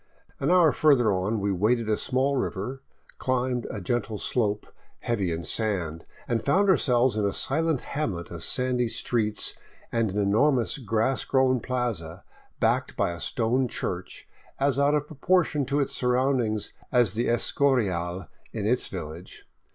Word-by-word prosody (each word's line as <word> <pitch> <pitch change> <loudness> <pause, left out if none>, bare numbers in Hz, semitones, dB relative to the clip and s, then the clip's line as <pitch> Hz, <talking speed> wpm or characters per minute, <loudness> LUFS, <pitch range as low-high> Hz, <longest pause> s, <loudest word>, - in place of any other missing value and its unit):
An - - 0
hour 175 -4 +5
further 130 -7 +3
on 95 +4 -1
we 100 0 0
waded 110 +5 +1
a 110 - +2
small 130 +5 0
river, 130 +2 -3 0.4
climbed 125 -1 -1
a 105 - -5
gentle 110 +3 -2
slope 105 -2 -1 0.4
heavy 100 -7 -1
in 80 +1 -3
sand, 90 -8 -2 0.2
and 115 -1 -1
found 195 +8 +3
ourselves 125 - +3
in 105 - 0
a 100 - +1
silent 160 +3 +1
hamlet 100 - -4
of 85 -2 -5
sandy 125 -1 +1
streets 115 -1 0 0.4
and 115 -2 +1
an 95 - -4
enormous 115 +7 +2
grass 115 +2 0
grown 130 -1 +2
plaza 110 -9 -3 0.4
backed - - 0
by - - +1
a 85 - -7
stone 125 +8 0
church, 90 -5 -5 0.3
as 140 0 +2
out 145 +1 +3
of 145 -1 0
proportion 150 -1 +1
to 140 +1 0
its 140 - -1
siu*roundings 125 -4 0 0.2
as 120 -6 +3
the 115 +3 -1
Escorial 95 -9 +1 0.3
in 105 -3 -4
its 125 +4 +1
village. 85 -1 -8
120 Hz, 150 wpm, -26 LUFS, 100-130 Hz, 0.4 s, hour